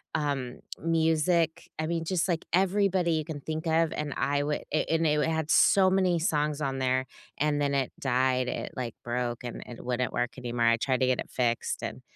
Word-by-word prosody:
um, 140 -5 -2 0.2
music, 165 0 +1
I 155 - -1
mean, 165 -1 -1
just 180 0 0
like 170 -2 -1
everybody 190 -2 +2
you 155 -1 -1
can 155 -2 -5
think 160 +3 -4
of, 165 0 +2
and 150 -2 -3
I 145 0 +1
would 150 0 -1
and 160 +1 +1
it 150 0 +2
it - - +1
had 160 -1 -1
so 190 -1 +5
many 185 -2 +2
songs 150 -3 0
on 135 -2 -1
there, 130 0 +1 0.3
and 150 0 +1
then 140 0 +1
it 135 -2 0
died, 130 -1 +1
it, - - -4
like, 120 -3 -4
broke, 120 0 -2
and 120 - -6
it 120 - -10
wouldn't 125 0 -1
work 125 +2 -2
anymore, 120 -1 0
I 115 0 +4
tried 130 +1 0
to 130 - +4
get 130 -1 +1
it - - -4
fixed, 120 -2 -1
and - - -5
150 Hz, 205 wpm, -28 LUFS, 130-165 Hz, 0.3 s, so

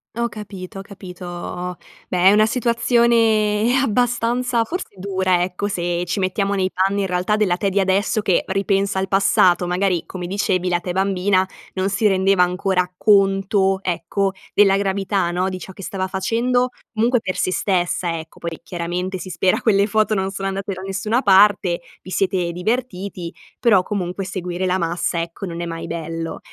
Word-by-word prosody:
Ho 235 0 -1
capito, 195 -3 -8
ho - - -5
capito. 180 -2 -7 0.3
Beh 180 - -2
è - - +6
una 215 +1 +5
situazione 235 -1 +2
abbastanza, 245 0 +1
forse 335 - -6
dura 185 -2 +1
ecco, 185 +3 -3
se 175 -2 -1
ci 175 - -1
mettiamo 195 +2 0
nei 185 -1 0
panni 195 +2 +1
in 195 - 0
realtà 180 +3 0
della 205 -5 +2
te 200 +1 0
di 195 +1 0
adesso 195 +3 +1
che 190 -4 +2
ripensa 195 +1 0
al 190 0 0
passato. 195 -2 +3
Magari, 180 -1 0
come 180 -2 -6
dicevi, 185 -1 0
la 175 -1 +1
te 180 - -5
bambina 190 0 +1 0.3
non 190 +1 -1
si 205 +2 +2
rendeva 190 -1 +3
ancora 180 0 +1
conto, 195 -1 +3
ecco, 185 +3 -1 0.2
della 195 -2 +5
gravità 195 -2 0
no, 180 +2 0
di 185 0 -5
ciò 190 - -9
che 195 - -11
stava 190 0 -3
facendo 240 +6 0 0.2
comunque 235 +3 +2
per 185 -4 -4
se 185 - 0
stessa 175 -3 0
ecco. 160 0 -10
Poi 170 -1 -5
chiaramente 180 +2 -3
si 185 - -7
spera 185 +2 +1
quelle 200 -3 +3
foto 215 0 +1
non 190 0 -1
sono 195 0 -4
andate 195 +1 -3
da 185 - -8
nessuna 200 +6 -1
parte 195 -3 +4 0.2
vi 185 - -12
siete 185 -2 0
divertiti. 190 -3 -3 0.3
Però 205 -7 +4
comunque 190 -1 -3
seguire 180 0 -3
la 185 +1 +1
massa, 170 0 -1
ecco, 170 +4 -6
non 170 -1 -5
è - - -2
mai 165 0 -5
bello. 165 0 -5
190 Hz, 175 wpm, -20 LUFS, 180-205 Hz, 0.3 s, è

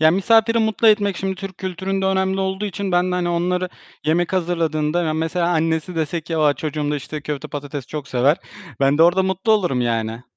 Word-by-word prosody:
ya, 155 0 +6
misafiri 225 +5 +3
mutlu 220 0 +3
etmek 205 -3 +3
şimdi 190 +1 -2
Türk 190 -1 -8
kültüründe 190 +1 -2
önemli 190 0 +1
olduğu 190 +1 -2
için 200 -1 -3
ben 180 +1 +2
de, - - 0
hani, 180 -1 0
onları 180 +1 0 0.4
yemek 170 +3 +1
hazırladığında 165 -2 0
ya, 160 -2 0
mesela 165 +2 0
annesi 165 +1 0
dese 160 +1 -1
ki, 165 +1 -4
"A, 150 -2 +3
çocuğum 150 -1 -3
da, 150 - 0
işte, 150 +2 -6
köfte 145 -1 -5
patates 145 -2 -6
çok 150 -3 -6
sever." 130 +5 +3 0.4
Ben 140 +2 +3
de - - +7
orada 175 +3 +5
mutlu 190 +3 +1
olurum 175 -12 +1
yani. 115 -1 -1
175 Hz, 205 wpm, -21 LUFS, 150-190 Hz, 0.4 s, de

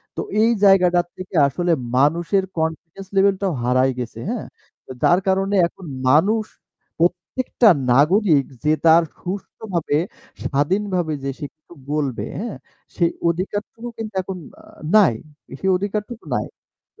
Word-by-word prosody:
তো - - -2 0.2
এই 230 - +4
জায়গাটার 180 -3 +5
থেকে 185 0 -8
আসলে 175 +5 -1 0.3
মানুষের 170 +7 +2
কনফিডেন্স 160 +4 -4
লেভেল 195 0 +4
টাও 190 -4 0
হারায় 130 +2 +2
গেছে, 115 -2 -6
হ্যাঁ? 235 -2 -4 0.4
তো - - -10
যার 175 - +5
কারণে 195 +1 +1
এখন 180 - -14 0.2
মানুষ 200 +11 +4 0.6
প্রত্যেকটা 185 +7 +2 0.2
নাগরিক 155 - +4 0.2
যে 150 - +3
তার 165 +1 +7 0.2
সুষ্ঠভাবে, 180 -4 -3 0.5
স্বাধীনভাবে 175 +3 0
যে 135 - -2
সে 150 - -4
কিছু 155 +2 -19 0.2
বলবে, 145 -5 -1
হ্যাঁ? 225 0 -5 0.4
সেই 170 -2 +2 0.2
অধিকারটুকু 205 +6 -4
কিন্তু 220 -2 -6
এখন 185 0 -6 0.2
আ - - -20 0.3
নাই। 200 - +6 0.5
সেই 190 - 0
অধিকারটুকু 210 +4 -4
নাই। - - -2 0.5
তো - - -23
180 Hz, 135 wpm, -21 LUFS, 155-200 Hz, 0.6 s, তার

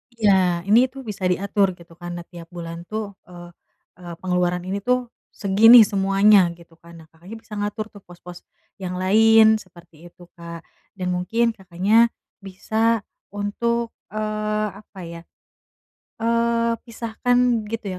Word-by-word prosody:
Iya. 190 -6 +2
Ini 225 +7 +4
tuh 270 +1 -11
bisa 190 -3 -2
diatur 195 +1 0
gitu, 170 -1 -17
kan. 175 0 -7
Nah, 175 - -7
tiap 170 -2 -12
bulan 170 0 -8
tuh, 215 -1 -4 0.2
eee 175 -1 -12 0.5
eee 175 -1 -9
pengeluaran 180 -1 -1
ini 190 +2 -3
tuh 250 +3 -1 0.2
segini 225 +4 +7
semuanya 195 -1 +4
gitu, 170 -1 -19
kan. 170 0 -16
Nah, - - -19
Kakaknya 175 +7 -12
bisa 215 - -13
ngatur 210 +1 -3
tuh 205 - -14
pos-pos 175 0 -12 0.4
yang 180 -1 -5
lain 220 +3 +5
seperti 175 -3 -16
itu, 175 +1 -18
Kak. 170 0 -9 0.3
Dan 180 -2 -3
mungkin 225 +7 0
Kakaknya 195 +3 +2 0.3
bisa 220 +3 -1 0.3
untuk, 230 +3 -2 0.2
eee, 215 0 -2
apa 205 -2 -16
ya, 170 0 -9 1.0
eee, 230 0 +1
pisahkan 235 0 0
gitu, 225 0 -5
200 Hz, 140 wpm, -22 LUFS, 180-225 Hz, 1.0 s, segini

